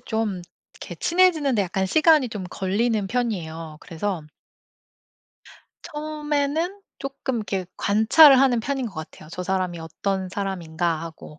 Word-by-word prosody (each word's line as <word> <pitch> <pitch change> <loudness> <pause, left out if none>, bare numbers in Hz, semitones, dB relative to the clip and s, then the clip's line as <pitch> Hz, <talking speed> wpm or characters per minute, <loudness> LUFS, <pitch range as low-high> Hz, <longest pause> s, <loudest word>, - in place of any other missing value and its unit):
좀 215 -5 -2 0.3
이렇게 - - -9
친해지는데 320 - +3
약간 190 +1 -1
시간이 310 - +4
좀 205 -5 -6
걸리는 205 +3 0
편이에요. 165 -10 -3
그래서 175 0 -4 1.7
처음에는 305 +4 -2 0.2
쪼끔 275 -2 -4
이렇게 195 -4 -3
관찰을 245 +7 +6
하는 260 -3 +4
편인 265 +1 -2
것 215 - -9
같아요. 155 -1 -9
저 180 +2 -5
사람이 185 -2 -1
'어떤 190 +4 -3
사람인가?'하고 165 -5 -4
205 Hz, 300 characters per minute, -24 LUFS, 180-275 Hz, 1.7 s, 관찰을